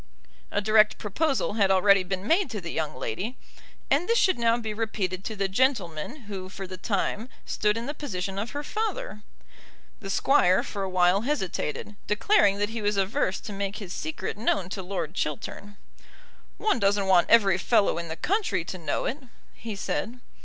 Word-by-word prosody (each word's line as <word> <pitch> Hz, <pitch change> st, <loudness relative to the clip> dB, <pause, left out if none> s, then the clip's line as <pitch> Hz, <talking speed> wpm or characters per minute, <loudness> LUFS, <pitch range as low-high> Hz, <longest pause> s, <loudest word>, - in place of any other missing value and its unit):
A 205 Hz, -, 0 dB
direct 215 Hz, 0 st, +4 dB
proposal 270 Hz, +5 st, 0 dB
had 205 Hz, -3 st, +3 dB
already 195 Hz, +1 st, +5 dB
been 185 Hz, +1 st, -4 dB
made 355 Hz, +4 st, +3 dB
to 215 Hz, -, -4 dB
the 170 Hz, -2 st, -6 dB
young 155 Hz, -4 st, -2 dB
lady, 190 Hz, -, -4 dB, 0.5 s
and 300 Hz, +8 st, +2 dB
this 465 Hz, -, +4 dB
should 375 Hz, -, +3 dB
now 230 Hz, 0 st, +3 dB
be 220 Hz, -3 st, -4 dB
repeated 200 Hz, -4 st, -2 dB
to 220 Hz, -, -4 dB
the 195 Hz, -1 st, 0 dB
gentleman 220 Hz, -, 0 dB
who 195 Hz, -4 st, -7 dB
for 195 Hz, 0 st, -7 dB
the 185 Hz, 0 st, -7 dB
time 205 Hz, +4 st, -2 dB, 0.2 s
stood 210 Hz, 0 st, +1 dB
in 230 Hz, -, -4 dB
the 290 Hz, -, -3 dB
position 195 Hz, -10 st, -4 dB
of 220 Hz, +4 st, -3 dB
her 290 Hz, +1 st, -5 dB
father. 420 Hz, -, -3 dB, 0.8 s
The 195 Hz, -, -7 dB
Squire 195 Hz, -4 st, +4 dB
for 200 Hz, -, -5 dB
a 195 Hz, -, -2 dB
while 185 Hz, +1 st, +3 dB
hesitated, 210 Hz, -, -2 dB
declaring 210 Hz, -, +3 dB
that 205 Hz, 0 st, 0 dB
he 225 Hz, 0 st, -4 dB
was 205 Hz, 0 st, 0 dB
averse 190 Hz, -1 st, 0 dB
to 210 Hz, -, -7 dB
make 200 Hz, 0 st, -3 dB
his 200 Hz, -3 st, -6 dB
secret 315 Hz, -9 st, -4 dB
known 195 Hz, -5 st, 0 dB
to 195 Hz, -, -3 dB
Lord 180 Hz, -4 st, -4 dB
Chiltern. 195 Hz, +6 st, -4 dB, 0.8 s
"One 425 Hz, -, +1 dB
doesn't 200 Hz, -1 st, +2 dB
want 185 Hz, -2 st, +4 dB
every 195 Hz, -5 st, +5 dB
fellow 200 Hz, -3 st, +3 dB
in 170 Hz, -, -5 dB
the 160 Hz, -, -4 dB
country 375 Hz, -, 0 dB
to 185 Hz, -, -6 dB
know 165 Hz, -, -2 dB
it," 270 Hz, -, -2 dB, 0.3 s
he 225 Hz, -3 st, -6 dB
said. 230 Hz, +4 st, -3 dB
205 Hz, 185 wpm, -27 LUFS, 190-235 Hz, 0.8 s, already